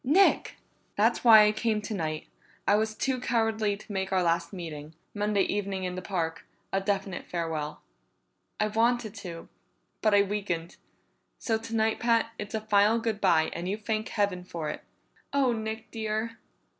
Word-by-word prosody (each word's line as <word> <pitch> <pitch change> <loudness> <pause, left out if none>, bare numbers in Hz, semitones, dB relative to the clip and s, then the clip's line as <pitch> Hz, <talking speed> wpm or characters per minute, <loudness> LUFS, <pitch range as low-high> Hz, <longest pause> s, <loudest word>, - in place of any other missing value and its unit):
"Nick!" 330 +10 +4 0.4
"That's - - +2
why 220 -3 +9
I 210 - +4
came 215 0 0
tonight. 165 -8 -3 0.4
I - - +5
was 215 +1 +1
too 260 +1 0
cowardly 225 -4 +1
to 215 - -12
make 190 0 -2
our 185 -1 +2
last 170 0 +1
meeting 160 -4 -7 0.2
Monday 205 -1 +1
evening 195 -2 -2
in 180 -1 -2
the 185 - -5
park 165 -3 -3 0.3
a 195 - +2
definite 195 -2 -2
farewell. 160 -3 -3 0.8
I 215 - +3
wanted 225 0 +1
to, 170 -3 -8 0.5
but 215 -2 +4
I 200 - +6
weakened. 190 -5 -3 0.6
So 225 -2 0
tonight, 225 -1 0
Pat, 230 -1 +2
it's 210 +1 -4
a 220 - -1
final 210 +1 +4
good 225 -2 -2
bye, 165 -5 +3
and 175 +2 -4
you 205 - -1
thank 215 0 -2
Heaven 200 -4 0
for 165 -4 -4
it!" - - -8 0.5
"Oh, 275 -3 +3
Nick 220 0 -5
dear!" 220 +1 -3
210 Hz, 165 wpm, -28 LUFS, 180-220 Hz, 0.8 s, why